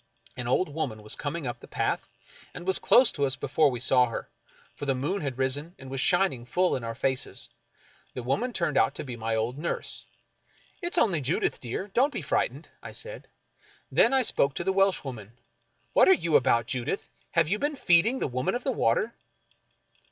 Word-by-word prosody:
An 125 -2 -5
old 155 +9 +2
woman 135 -8 -4
was 105 - -5
coming 150 +1 -4
up 120 -1 -4
the - - -13
path, - - -2 0.5
and 175 - -7
was 190 0 +3
close 255 0 +5
to 140 - -3
us 135 -2 +1
before 145 +2 +2
we 125 -2 -4
saw 125 0 +4
her, 115 - -6 0.4
for 145 - -7
the 135 - +2
moon 160 +10 -2
had 135 -4 -3
risen, 145 +6 -1
and 130 0 -11
was 135 -1 -1
shining 175 -9 +2
full 180 +9 +1
in 125 - -4
our 115 0 -4
faces. 130 +1 -2 0.6
The 125 - -4
woman 205 - 0
turned 170 - 0
out 140 - +2
to - - -5
be 125 -4 -6
my 115 0 -2
old 115 +5 -2
nurse. 170 - -4 0.4
" - - -34
It's 345 +1 -1
only 190 - +3
Judith, 140 +6 0
dear 125 - -4
— - - -35
don't 270 +4 +3
be - - -5
frightened," - - -1
I - - -9
said. - - -8 0.6
Then - - +4
I 265 -1 +3
spoke 140 - +1
to - - -2
the 190 +2 +1
Welshwoman: 135 - 0 0.3
" - - -40
What - - +6
are - - +9
you 170 - 0
about, 125 -4 +4
Judith? 125 +10 -3 0.3
Have 165 -2 +3
you 205 +6 0
been 290 +1 -1
feeding 220 +2 +3
the - - -1
Woman 130 - -1
of 245 - -3
the 270 - 0
Water 215 - +1
145 Hz, 210 wpm, -27 LUFS, 125-190 Hz, 0.6 s, are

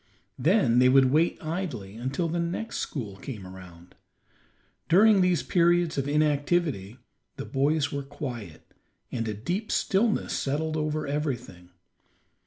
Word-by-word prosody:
Then 135 - +3
they 125 0 +6
would 130 0 +5
wait 160 +4 +2
idly 155 - -4
until 130 +8 -2
the 170 +1 -2
next 170 +7 -3
school 105 -9 -5
came 105 -4 -8
around. 90 -2 -13 1.0
During 200 +3 +6
these 180 -2 +2
periods 175 -1 +2
of 140 0 -1
inactivity 145 - 0 0.4
the - - -6
boys 145 +2 +1
were 140 - -3
quiet, 125 - -8 0.4
and 115 -2 -2
a 105 - -3
deep 175 - -3
stillness 210 +3 +1
settled 155 +3 -1
over 155 0 -1
everything. 125 - -4
145 Hz, 130 wpm, -27 LUFS, 120-170 Hz, 1.0 s, they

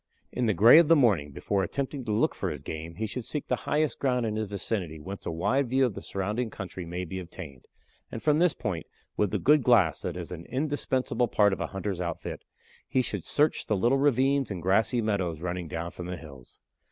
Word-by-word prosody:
In 125 -1 0
the 105 - +2
gray 115 - +9
of 170 - +4
the 165 - +7
morning, 105 - +3
before 100 +7 -1
attempting 135 - -3
to 110 - -2
look 105 - +2
for - - -3
his 75 -2 -6
game, 80 +2 -6
he 110 - -2
should 115 +3 -5
seek 150 +5 -4
the - - 0
highest 150 0 +1
ground 125 -3 +1
in 110 -1 -2
his 110 -1 -2
vicinity 95 -5 -3
whence 95 +6 -7
a - - -1
wide 105 +11 0
view 130 +1 +3
of 120 - -1
the - - -7
surrounding 105 +5 -2
country 95 -3 -7
may 90 +2 -4
be 95 +3 -5
obtained, 85 -7 -9 0.5
and 115 - -6
from 150 0 +3
this 175 -2 +4
point, 90 -6 -4 0.3
with 105 - +1
the - - 0
good 150 +1 +4
glass 115 - +4
that - - -4
is - - -6
an 85 -1 -7
indispensable 130 -3 0
part 105 -2 +3
of - - -4
a - - -1
hunter's 95 -1 -4
outfit, 85 -2 -5 0.4
he 130 - +1
should 105 -6 -4
search 150 +1 +2
the 105 - +1
little 120 +8 +3
ravines 135 -1 +2
and 90 -5 -5
grassy 110 +5 +2
meadows 95 -7 -1
running 90 0 -4
down 85 +2 -4
from 90 - -7
the 90 0 -4
hills. 70 -7 -13
105 Hz, 225 wpm, -28 LUFS, 90-130 Hz, 0.5 s, gray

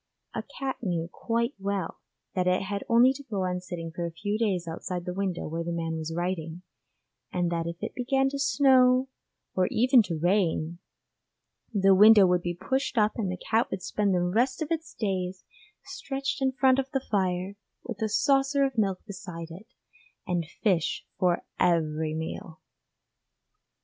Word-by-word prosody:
A - - -2 0.2
cat 270 -1 -2
knew 175 -6 -1
quite 235 +3 -1
well 195 -3 -3 0.3
that 185 -1 0
it 180 +1 +2
had 200 +1 -3
only 240 +3 +6
to 275 - -9
go 210 -8 -3
on 180 0 -1
sitting 170 -2 -6
for 170 +1 -4
a 170 - -3
few 205 +6 -3
days 190 -6 0
outside 175 +2 -4
the 180 - -3
window 190 -2 -2
where 165 +2 -3
the 170 - -3
man 165 -1 -2
was 160 0 -4
writing, 175 0 -3 0.7
and 175 -1 0
that 165 -1 -1
if 170 - -4
it 220 - -3
began 270 +2 +1
to 280 0 -5
snow 260 -2 +4 0.4
or 185 -1 +2
even 250 +2 +5
to 175 -6 -3
rain, 170 -1 +1 0.9
the 195 -3 +4
window 210 +1 +8
would 180 -1 +2
be 175 0 -3
pushed 260 +6 -1
up 210 -1 +4
and 200 -5 -2
the 180 - -4
cat 225 +5 0
would 190 -1 -5
spend 205 -2 0
the 175 - +1
rest 235 +9 +1
of 310 - -8
its 325 -1 -3
days 185 -3 -2 0.4
stretched 270 0 -4
in 265 0 +2
front 260 0 +3
of 270 0 -2
the 270 - +2
fire, 185 -1 0 0.3
with 225 -4 -7
a 220 - +1
saucer 275 +4 +3
of 265 -4 0
milk 195 -3 0
beside 180 -5 -8
it, 190 +7 -11 0.6
and 175 -5 -1 0.2
fish 185 -8 +1
for 180 -2 +2 0.2
every 160 -3 +1
meal. 160 +1 -6
190 Hz, 175 wpm, -27 LUFS, 175-240 Hz, 0.9 s, window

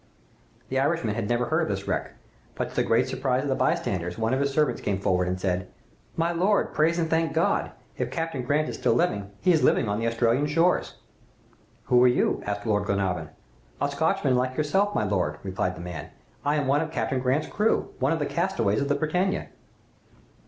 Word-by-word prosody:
"The 130 - 0
Irishman 140 -6 +1
had 105 -1 -3
never 120 0 +1
heard - - +1
of - - 0
this - - -3
wreck, - - -2 0.4
but, - - -3
to - - -14
the - - +2
great - - +2
surprise 130 -1 0
of 145 - -2
the - - +3
bystanders, 90 -9 -1
one 110 +2 0
of 130 - +1
his 140 0 +1
servants 150 +1 +1
came 100 -1 -1
forward 90 -2 +1
and 90 0 -2
said, 90 -1 -1 0.5
"'My 165 +1 +1
lord, 190 +4 +1
praise 165 +2 +2
and 165 -1 +1
thank 160 0 +1
God! - - +1 0.3
If - - -1
Captain 165 -5 -3
Grant 145 +5 +1
is - - -4
still - - +2
living, 100 - 0
he 180 - +4
is 160 - +3
living - - +3
on 105 +1 -1
the 115 - 0
Australian 115 +4 +2
shores.' 165 +4 +1 0.9
"'Who 125 0 +4
are - - +7
you?' 125 - +2
asked 100 0 -3
Lord 105 -2 +1
Glenarvan. 95 -5 -1 0.5
"'A 145 - 0
Scotchman 140 -2 +1
like 130 +1 0
yourself, 195 +7 +1
my - - +1
lord,' 90 -7 0
replied 95 -1 -2
the - - -9
man; 85 -4 -7 0.3
'I 145 +1 +1
am 145 -2 0
one 140 +3 +3
of 160 - -3
Captain 135 -4 -1
Grant's 130 +4 +1
crew 210 +2 0
one - - +2
of 165 - +1
the 145 - -1
castaways 170 - 0
of 140 - 0
the 145 - +3
"Britannia. 180 +6 -1
130 Hz, 210 wpm, -26 LUFS, 105-160 Hz, 0.9 s, are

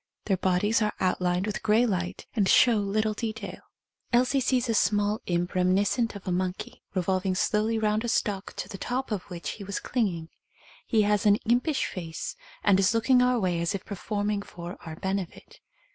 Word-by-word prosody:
Their 195 -3 +1
bodies 190 +5 +2
are 210 -1 0
outlined 180 0 +1
with 210 -2 -3
grey 225 +2 +4
light 185 -5 -2
and 200 -4 +2
show 235 -3 +6
little 215 +2 0
detail. 215 -4 -5 0.5
Elsie 250 +3 +3
sees 255 -1 +1
a 230 - +1
small 205 +1 +2
imp 175 +1 -1
reminiscent 200 +5 +2
of 200 - -10
a - - 0
monkey, 180 +1 -3
revolving 185 +1 0
slowly 215 +3 +1
round 215 0 +1
a - - -2
stalk 205 -4 -1
to - - -4
the 195 - -8
top 250 +3 -3
of 205 -4 -1
which 170 -5 -5
he 205 - -8
was 200 0 -3
clinging. 180 -10 -1 0.6
He 220 -2 +3
has 210 0 +2
an 205 - +7
impish 250 +6 +2
face 165 -3 -5 0.3
and 195 -2 +4
is 195 +3 +3
looking 250 +2 +4
our 250 -1 +3
way 180 -4 0
as 170 +3 0
if 190 - -6
per - - -6
forming 205 +1 -2
for 175 -1 -8
our 160 -1 -7
benefit. 190 0 -5
205 Hz, 190 wpm, -27 LUFS, 185-220 Hz, 0.6 s, an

